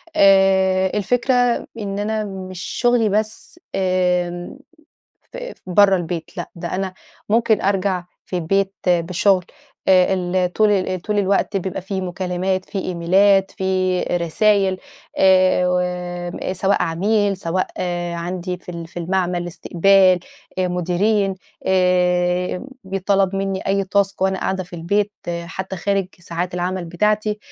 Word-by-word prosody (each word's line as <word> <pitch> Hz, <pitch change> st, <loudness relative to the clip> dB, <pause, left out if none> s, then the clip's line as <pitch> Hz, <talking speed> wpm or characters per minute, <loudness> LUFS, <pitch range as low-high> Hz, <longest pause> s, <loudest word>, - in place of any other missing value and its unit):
آآ، 190 Hz, -3 st, +4 dB
الفكرة 245 Hz, +5 st, +1 dB, 0.5 s
إن 200 Hz, -1 st, -4 dB
أنا 215 Hz, +1 st, -1 dB
مش 185 Hz, -2 st, -7 dB
شُغلي 240 Hz, -3 st, +1 dB
بس 215 Hz, -, -3 dB, 0.2 s
آمم، 180 Hz, +1 st, 0 dB, 0.8 s
ف -, -, -8 dB, 0.3 s
برَّه 195 Hz, +1 st, +5 dB
البيت، 170 Hz, -1 st, -4 dB
لأ، 175 Hz, -, -5 dB
ده 170 Hz, 0 st, -5 dB
أنا 190 Hz, 0 st, -3 dB, 0.3 s
ممكن 225 Hz, -1 st, +3 dB
أرجَع 190 Hz, -2 st, 0 dB, 0.2 s
في 180 Hz, -, -4 dB
البيت 195 Hz, +3 st, 0 dB
بشُغل 180 Hz, +2 st, +2 dB, 0.4 s
أ 185 Hz, 0 st, +5 dB
ال 180 Hz, 0 st, 0 dB
طُول 195 Hz, -4 st, +1 dB
طُول 205 Hz, +3 st, -1 dB
الوقت 200 Hz, 0 st, +1 dB
بيبقى 190 Hz, 0 st, -3 dB
في 190 Hz, 0 st, -3 dB
مكالمات، 185 Hz, +1 st, -2 dB
في 200 Hz, -, -5 dB
إيميلات، 190 Hz, +2 st, +3 dB
في 185 Hz, -1 st, +1 dB
رسايل، 190 Hz, +3 st, +1 dB, 0.4 s
آآ، 180 Hz, -1 st, +1 dB
سواء 195 Hz, +2 st, +1 dB
عميل، 200 Hz, +4 st, +1 dB
سواء 180 Hz, +1 st, -1 dB
آآ 175 Hz, -1 st, -2 dB
و -, -, -4 dB
عَندي 180 Hz, +1 st, -4 dB
في -, -, -28 dB
ال 170 Hz, -1 st, -6 dB
في 170 Hz, -, -23 dB
المعمل، 175 Hz, 0 st, -1 dB
إستقبال، 185 Hz, +2 st, +3 dB, 0.4 s
مديرين، 185 Hz, +3 st, +1 dB, 0.3 s
آآ 180 Hz, 0 st, +2 dB, 0.2 s
بيتْطلب 195 Hz, 0 st, 0 dB
منّي 195 Hz, -1 st, -2 dB
أي 195 Hz, 0 st, +1 dB
تاسك 195 Hz, 0 st, 0 dB
وأنا 190 Hz, 0 st, +1 dB
قاعدة 190 Hz, -1 st, -1 dB
في 175 Hz, 0 st, -10 dB
البيت 205 Hz, +5 st, 0 dB, 0.3 s
حتى 190 Hz, +3 st, -6 dB
خارج 195 Hz, +2 st, 0 dB
ساعات 175 Hz, +1 st, -4 dB
العمل 180 Hz, 0 st, -2 dB
بتاعتي. 210 Hz, +5 st, 0 dB
185 Hz, 125 wpm, -20 LUFS, 180-195 Hz, 0.8 s, برَّه